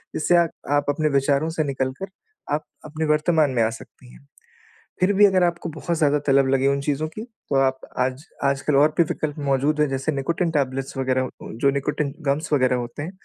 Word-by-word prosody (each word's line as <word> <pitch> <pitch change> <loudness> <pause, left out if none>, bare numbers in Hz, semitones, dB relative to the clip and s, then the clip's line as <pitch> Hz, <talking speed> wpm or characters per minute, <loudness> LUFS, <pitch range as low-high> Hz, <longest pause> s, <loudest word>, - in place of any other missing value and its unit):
जिससे 175 +3 +2
आ 170 - +6 0.3
आप 145 0 +1
अपने 155 +1 +1
विचारों 140 +3 +1
से 160 -1 -1
निकल 135 -2 -2
कर, 195 - -3 0.5
आप 150 - -1 0.2
अपने 155 +1 -3
वर्तमान 150 -1 +2
में 120 -3 +2
आ 110 - +2
सकती 120 +2 -12
हैं। - - -18 0.7
फिर 185 +2 +3
भी 205 +1 +6
अगर 190 -2 +3
आपको 170 -1 -1
बहुत 165 +2 -3
ज़्यादा 150 -2 +2
तलब 135 -1 +4
लगे 135 0 +2
उन 140 0 +1
चीज़ों 145 +2 -1
की, 215 - -8
तो 225 - -7
आप 130 0 +1 0.2
आज 130 +3 -1 0.2
आजकल 140 +1 +1
और 150 +2 +5
भी 170 - +6
विकल्प 155 -3 -3
मौजूद 145 +3 +1
हैं 150 - +3
जैसे 135 +3 -1
निकोटिन 165 +5 -1
टैबलेट्स 135 -2 -2
वगैरह 130 -1 +1 0.2
उ - - -8
जो 140 - +4
निकोटिन 140 0 -2
गम्स 145 +4 -1
वगैरह 130 -3 +3
होते 120 +4 -5
हैं, 170 - -5
145 Hz, 210 wpm, -23 LUFS, 135-155 Hz, 0.7 s, आ